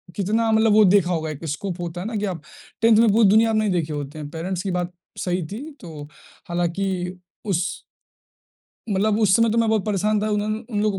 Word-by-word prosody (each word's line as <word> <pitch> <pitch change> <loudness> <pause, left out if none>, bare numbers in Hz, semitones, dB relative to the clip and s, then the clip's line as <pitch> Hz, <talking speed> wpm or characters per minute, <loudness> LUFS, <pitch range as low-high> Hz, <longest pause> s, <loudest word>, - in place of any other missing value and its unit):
कितना 220 +3 +1
मतलब 220 -1 +4
वो 215 0 +7
देखा 180 -2 +3
होगा 160 -2 -1
एक 155 +2 -8
स्कोप 175 +4 -4
होता 175 +1 -5
है 205 - -4
ना, 225 - -5
कि 210 - -1
आप 180 -5 -4 0.4
10th 225 -1 +5
में 230 -3 +5
पूरी 220 -2 +5
दुनिया 225 +2 +5
आप 220 - 0
नहीं 215 -2 +1
देखे 160 -4 -1
होते 145 +1 -6
हैं। 145 -1 -6
पैरेंट्स 175 +3 -4
की 195 - -2
बात 180 0 -2 0.3
सही 180 -1 -1
थी, 285 +9 -7
तो 155 -5 -9 0.5
हालाँकि 180 +1 -2 0.3
उस 185 -4 +1 1.3
मतलब 205 +2 +1
उस 195 -3 +4
समय 230 -1 +3
तो 230 - +1
मैं 225 -1 +2
बहुत 220 -2 +1
परेशान 210 0 0
था, 215 - 0
उन्होंने 210 +1 -1
उन 205 - 0
लोगों 205 -3 0
195 Hz, 220 wpm, -22 LUFS, 175-215 Hz, 1.3 s, वो